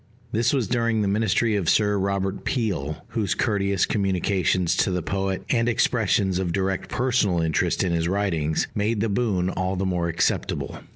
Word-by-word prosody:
This 115 +1 +2
was 130 -6 0
during 115 -3 +1
the - - 0
ministry 110 +2 +1
of 95 -5 0
Sir 105 -1 +3
Robert 100 0 -1
Peel, 85 - -2
whose 105 -6 -1
courteous 100 -5 +1
communications 95 -3 +1
to - - +2
the 90 -2 -2
poet, 95 -1 -2
and 120 -1 +2
expressions 100 -5 +1
of 90 -2 -1
direct 95 -1 -1
personal 125 -8 +1
interest 80 +2 +1
in 90 - 0
his 85 0 0
writings, 85 -5 0
made 105 +1 0
the 110 +2 0
boon 100 -5 0
all 95 +1 -2
the 95 +1 -1
more 90 -2 0
acceptable. 85 0 -1
100 Hz, 170 wpm, -24 LUFS, 90-110 Hz, -, Sir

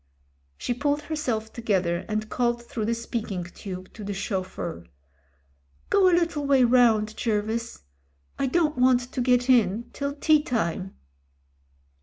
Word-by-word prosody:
She - - -2
pulled 290 +4 -1
herself 250 -8 -3
together, 190 -7 0
and 215 0 -2
called 240 0 0
through 220 -2 -3
the 230 - +1
THE 230 - -5
DEATH - - -12
GRIP 235 -3 0
199 180 -4 -6
speaking - - -15 0.2
tube - - -23
to 215 - -9
the 200 0 -3
chauffeur. 185 - -4 1.1
"Go 390 -2 +5
a 345 - +4
little 325 -4 0
way 270 -2 +5
round, 230 -3 +4
Jervis. 225 - -2 0.6
I 275 - +1
don't 300 -1 +1
want 250 0 +5
to 250 +1 -4
get 245 0 +3
in 235 -2 +2
till 280 0 -3
tea 305 +1 +4
time." 195 - -2
235 Hz, 160 wpm, -26 LUFS, 215-270 Hz, 1.1 s, Go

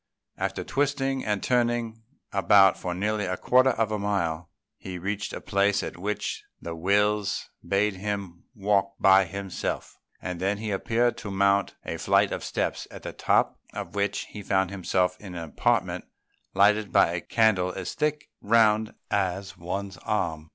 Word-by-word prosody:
After - - -2
twisting 135 -1 0
and 105 -2 -1
turning 120 -2 0 0.3
about 95 0 +6
for 90 -1 -4
nearly 105 +2 -1
a 90 0 -2
quarter 130 +1 +4
of 115 -4 0
a 105 - -1
mile, 85 -5 -1 0.3
he 95 -2 -7
reached 100 +3 -3
a - - -5
place 100 0 +1
at - - -5
which 105 +4 -3 0.2
the 85 0 -6
Wills 100 +3 +1
bade 100 0 +1
him 100 -3 -5
walk 100 -1 +1
by 95 0 +6
himself; 95 +1 -5 0.2
and 90 +1 -5
then 100 +2 0
he 110 0 -4
appeared 115 +5 +1
to 105 - -6
mount 100 +1 +2
a - - -3
flight - - +3
of - - -3
steps, - - -2
at - - -11
the - - -6
top - - +1 0.2
of 95 -4 -5
which 100 0 0
he 105 - -8
found 95 -1 +1
himself 90 -1 0
in 95 -4 -9
an 85 - -4
apartment 80 - 0 0.5
lighted 105 0 +4
by - - +5
a 85 0 -2
candle 100 -5 +2
as 95 -1 -5
thick 150 -1 -1
round 110 0 +3 0.2
as 95 -1 -1
one's 95 +3 -5
arm. 80 -7 -2
100 Hz, 165 wpm, -26 LUFS, 95-105 Hz, 0.5 s, about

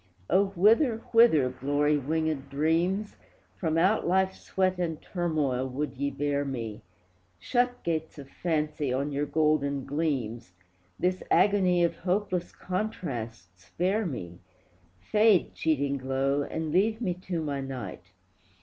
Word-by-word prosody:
O, 195 +2 +4
whither, 225 - +4
whither, 230 - +6
glory 145 +3 +1
wingèd 150 0 -1
dreams, 165 +8 0 0.4
From 160 -3 -1
out 190 +6 +3
Life's 190 +1 +1
sweat 185 -1 0
and 165 -3 -2
turmoil 150 -8 -1
would 140 +4 -3
ye 140 +2 -1
bear 145 +1 -1
me? 115 -6 -5 0.6
Shut, 245 - 0
gates 160 -2 -2
of 140 -2 -9
Fancy, 150 -3 -2
on 140 +3 -1
your 145 +1 -1
golden 145 -3 +1
gleams, 125 - -2 0.4
This 185 +1 0
agony 185 -4 +4
of 170 -1 0
hopeless 185 -1 -1
contrast 120 - -5
spare 190 - -1
me! 90 - -6 0.6
Fade, 210 - +3
cheating 140 -3 0
glow, 135 +2 0
and 160 +2 -3
leave 215 +6 +2
me 195 -7 -1
to 180 -1 -4
my 145 -3 -2
night! 130 -9 -6
155 Hz, 130 wpm, -28 LUFS, 140-185 Hz, 0.6 s, whither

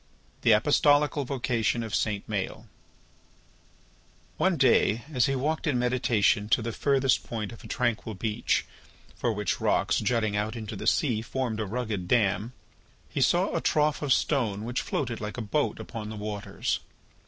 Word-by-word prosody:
THE 115 - +5
APOSTOLICAL 145 +4 +3
VOCATION 120 -3 0
OF 110 - -6
SAINT 105 -2 -1
MAËL 105 -3 -3 1.7
One 190 -3 +2
day 120 -4 +3
as 125 -3 +3
he 135 - 0
walked 150 +5 -1
in 140 -5 +2
meditation 120 -4 +2
to 115 - +3
the 115 - -2
furthest 135 +2 +2
point 110 -3 -4
of 115 - -12
a - - -9
tranquil 115 -3 -1
beach, 105 +2 0 0.5
for 120 - 0
which 105 -3 -2
rocks - - +2
jutting 110 -4 0
out 105 +2 -1
into 110 -2 -6
the 105 +3 -5
sea 115 -5 +2
formed 115 -1 -3
a 110 - -2
rugged 110 -4 -3
dam, 110 +1 +1 0.6
he - - -2
saw - - +2
a - - 0
trough 150 -1 +1
of 145 -2 -1
stone 110 -7 +1
which 120 +1 -1
floated 120 -6 -3
like 105 +2 -5
a - - -2
boat 145 +8 -1
upon 110 -2 -6
the 110 - -6
waters. 105 -1 -3
115 Hz, 165 wpm, -27 LUFS, 105-130 Hz, 1.7 s, THE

